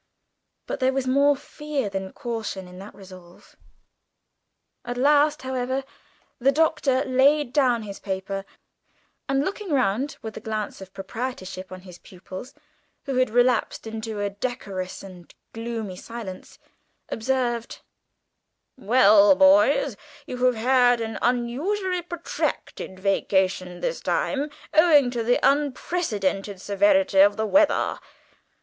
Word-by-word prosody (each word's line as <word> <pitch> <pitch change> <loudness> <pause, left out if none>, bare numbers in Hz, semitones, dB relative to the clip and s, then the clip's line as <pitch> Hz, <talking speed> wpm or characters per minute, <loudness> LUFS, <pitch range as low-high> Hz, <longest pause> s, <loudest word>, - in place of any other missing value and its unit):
But - - -4
there 260 0 +2
was 270 -1 -1
more 280 +2 +4
fear 290 -2 -4
than 190 -1 -4
caution 220 -6 -5
in 180 0 -12
the 200 +2 -9
resolve. 185 -3 -15 1.3
At 245 0 -5
last, 290 +2 +3
however, 260 +1 -2 0.6
the 265 +3 +4
Doctor 290 -3 +1
laid 265 +1 +3
down 250 -6 +2
his 200 -2 -8
paper, 195 0 -4 0.9
and, 275 +1 +1
looking 400 0 -4
round 260 -1 0
with 220 -1 -6
the - - -7
glance 215 -2 -4
of 190 0 -10
proprietorship 195 -2 -6
on 185 0 -8
his 180 -2 -13
pupils, 185 +6 -11 0.5
who 270 -2 -2
had 255 -2 +3
relapsed 245 0 +1
into 220 -1 -5
a 205 0 -1
decorous 200 -5 -5
and 180 -3 -12 0.2
gloomy 225 -4 -5
silence, 225 -5 -9 0.5
observed: 240 -1 -2 1.0
"Well, 215 -1 +6
boys, 300 - +4 0.3
you 250 0 -5
have 250 -1 +3
had 245 +1 +3
an 225 -1 -4
unusually 325 +11 0
protracted 340 - -4
vacation 190 -2 0
this - - -2
time 295 - -1 0.2
owing 305 -6 +5
to 240 -1 -2
the 240 +2 +2
unprecedented 255 - 0
severity 280 +2 +2
of 205 +2 +6
the 220 - 0
weather. 295 +7 +2
240 Hz, 125 wpm, -24 LUFS, 195-275 Hz, 1.3 s, Well